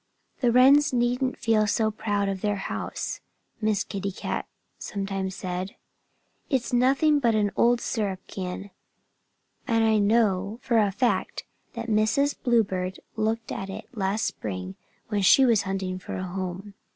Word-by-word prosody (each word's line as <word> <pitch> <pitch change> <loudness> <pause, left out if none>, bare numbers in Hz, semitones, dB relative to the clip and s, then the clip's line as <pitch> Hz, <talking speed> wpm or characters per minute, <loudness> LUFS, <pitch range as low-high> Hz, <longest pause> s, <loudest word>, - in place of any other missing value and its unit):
"The 245 -3 +3
Wrens 275 +4 +6
needn't 250 +1 0
feel 215 -2 +2
so 220 +1 +1
proud 205 -2 -1
of 195 -1 -3
their 205 -1 0
house," 195 - -4 0.4
Miss 215 -2 +1
Kitty 200 -1 -4
Cat - - -4 0.3
sometimes 195 -1 -3
said. 185 0 -4 0.7
"It's 260 -1 -1
nothing 275 +5 +4
but 235 -4 +2
an 205 -2 +1
old 240 0 +4
syrup 205 -6 -2
can. 190 +1 -6 1.0
And 225 -1 +2
I 220 -1 +3
know 205 -1 +2
for 235 -3 +3
a 205 -2 +2
fact 245 +4 0 0.3
that 230 -1 -5
Mrs. 220 +6 +2
Bluebird 190 -7 +1 0.2
looked 225 +1 -1
at 195 - -4
it 215 +5 -9
last 200 +1 0
spring 95 -2 -4 0.3
when 210 -2 0
she 265 +7 +6
was 230 -5 +4
hunting 190 -1 -2
for - - -7
a 185 - -3
home. 185 +2 -5
210 Hz, 150 wpm, -26 LUFS, 195-235 Hz, 1.0 s, Wrens